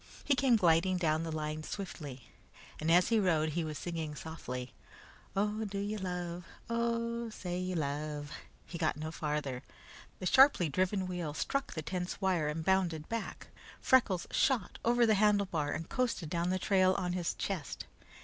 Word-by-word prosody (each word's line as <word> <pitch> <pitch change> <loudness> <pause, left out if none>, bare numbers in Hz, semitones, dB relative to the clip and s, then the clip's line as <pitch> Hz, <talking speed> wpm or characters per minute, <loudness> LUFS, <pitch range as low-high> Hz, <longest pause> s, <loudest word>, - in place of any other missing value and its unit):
He 290 - +3
came 260 -2 +4
gliding 180 -1 +4
down 160 -3 +1
the 165 0 -3
line 155 0 -3
swiftly, 150 - -7 0.5
and 155 - -1
as 175 +2 +5
he 225 -1 +4
rode 160 -5 +2
he 165 +2 -1
was 155 -2 -4
singing 160 -3 -4
softly: 125 -6 -6 0.6
"Oh, 210 +2 0
do 200 -2 -4
you 205 +2 -2
love, 180 -2 -4 0.3
Oh, 235 0 -1
say 180 -4 -4
you 185 0 -2
love 150 -1 -3 0.2
" - - -30
He 170 - -7
got 155 -3 +1
no 155 +1 -4
farther. 150 -5 -2 0.6
The 185 - -6
sharply 260 - +6
driven 185 +5 +1
wheel 175 -5 -4
struck 275 - -1
the 155 - -3
tense 180 +2 -3
wire 185 -6 +1
and 160 +1 -3
bounded 175 -5 +1
back. 230 -1 -4 0.3
Freckles 220 -9 +3
shot 250 -9 +1
over 240 +1 +4
the 220 - +4
handlebar 200 -7 +2
and 165 - -3
coasted 240 - -1
down 170 0 0
the 185 - +1
trail 185 0 +3
on 180 -2 -1
his 180 -2 -1
chest. 190 -7 -4
180 Hz, 170 wpm, -33 LUFS, 155-200 Hz, 0.6 s, sharply